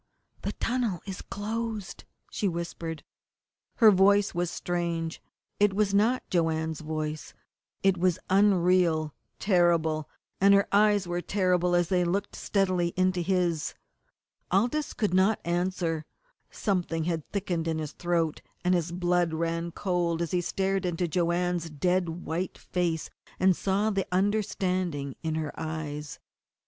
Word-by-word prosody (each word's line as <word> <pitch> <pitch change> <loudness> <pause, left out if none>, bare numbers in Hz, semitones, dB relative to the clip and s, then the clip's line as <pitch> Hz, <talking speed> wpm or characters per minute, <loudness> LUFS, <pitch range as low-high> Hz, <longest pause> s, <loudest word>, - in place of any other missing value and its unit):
"The - - -3
tunnel 230 -7 -1
is 190 -2 -6
closed!" 215 -1 -4 0.3
she 205 - -1
whispered. 170 -3 -4 0.7
Her 220 -3 +7
voice 200 +1 +4
was 175 -1 -1
strange. 170 -2 -3 0.4
It 205 -1 +3
was 205 -1 +1
not 225 +5 +2
Joanne's 160 -2 0
voice. 155 -1 -4 0.5
It 190 -2 +3
was 180 -1 +2
unreal, 180 -5 +3 0.2
terrible, 170 -5 +2 0.3
and 200 +1 +6
her 200 - +3
eyes 205 -1 +4
were 175 0 -2
terrible 180 -2 +1
as 175 -1 +2
they 180 -2 +2
looked 190 +4 -1
steadily 185 -4 0
into 185 -1 +2
his. 175 -3 0 0.7
Aldous 240 +11 +1
could 210 -5 -1
not 190 +4 +3
answer; 170 -2 -1 0.4
something 175 -5 -1
had 165 -2 -1
thickened 180 -5 -2
in 160 -1 0
his 155 -2 -4
throat, 170 -3 -1 0.2
and 180 - +4
his 170 -1 0
blood 175 -2 +1
ran 165 +1 -2
cold 170 -2 0
as 165 - -4
he 180 - +1
stared 195 +2 -1
into 175 -1 -1
Joanne's 175 0 0
dead 180 +4 0 0.2
white 175 +4 -3
face 170 -3 -2 0.3
and 185 -1 +4
saw 200 +4 +1
the 195 -2 -1
understanding 185 -7 0
in 160 -1 -2
her 155 -2 -3
eyes. 155 -2 -5
180 Hz, 135 wpm, -28 LUFS, 165-195 Hz, 0.7 s, Her